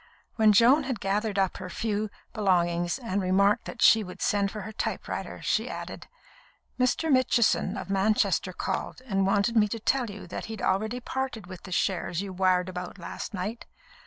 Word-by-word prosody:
When 220 -2 +5
Joan 245 +8 +5
had 260 -4 -3
gathered 205 +1 -1
up 190 -2 +1
her 180 - -7
few 215 +2 -2 0.2
belongings, 175 -3 +1
and 205 -6 -2
remarked 200 +4 +3
that - - -3
she 220 -1 +7
would 180 -2 -9
send 200 -1 +1
for 210 +1 -6
her 220 - -7
typewriter, 220 - -4
she - - 0
added: - - -7 0.7
"Mr. 255 +5 +1
Mitchison, 235 -6 +3
of - - -6
Manchester, 195 -2 +2
called, 250 - -4
and 195 -5 +1
wanted 205 +4 +2
me 210 -2 +5
to 225 +2 -4
tell 245 +1 +1
you 205 0 -8
that 180 - -6
he'd 220 -1 -7
already 220 +5 0
parted 260 -4 -4
with 185 0 -10
the 185 - -9
shares 180 -2 0
you 195 -1 -4
wired 185 -1 +2
about 180 +1 -6
last 200 +4 -6
night. 205 +5 -5
205 Hz, 180 wpm, -27 LUFS, 185-225 Hz, 0.7 s, she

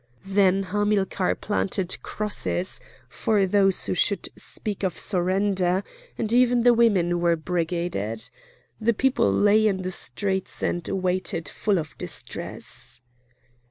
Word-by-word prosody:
Then 195 0 +3
Hamilcar 200 -1 0
planted 190 -3 -2
crosses 205 -3 -3 0.3
for 210 -4 +1
those 195 0 +3
who - - -1
should 200 +3 0
speak 210 -3 -5
of 190 -3 -1
surrender, 185 0 +1 0.3
and 225 0 0
even 245 -1 +4
the 245 0 +6
women 190 -7 +3
were 170 -1 +3
brigaded. 165 - -2 0.5
The 235 +1 +2
people 255 - +2
lay 210 - +4
in 190 -3 -1
the 185 - -3
streets 190 0 0
and 175 -1 -1
waited 185 -4 -1
full 200 +6 0
of 155 -5 -5
distress. - - -4
190 Hz, 125 wpm, -25 LUFS, 175-210 Hz, 0.5 s, the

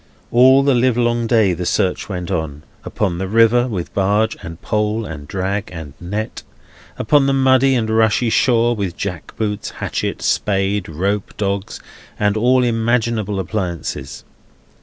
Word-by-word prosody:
All 130 +3 +6
the 140 -1 +3
livelong 120 -1 +1
day 110 -6 +3
the 90 +1 -4
search 90 +3 -1
went 90 -1 -4
on; 80 -4 -3 0.2
upon 90 -5 -2
the 95 - -2
river, 115 +4 +4
with 95 -8 -5
barge 105 +3 +1
and 80 +1 -8
pole, 105 +1 -1
and 75 -5 -8
drag 95 +3 -3
and 80 -5 -8
net; 105 +6 -4 0.6
upon 140 +4 +3
the 135 - +2
muddy 135 0 +4
and 115 -3 0
rushy 110 +1 +2
shore, 120 -1 +3
with 95 -5 -4
jack 90 -4 -5
boots, 105 -2 -2
hatchet, - - -3
spade, 100 -1 0
rope, 95 +6 -2
dogs, 100 -1 -3 0.4
and 105 0 +2
all 125 +3 +3
imaginable 115 -3 0
appliances. 85 -8 -4
105 Hz, 145 wpm, -19 LUFS, 95-120 Hz, 0.6 s, All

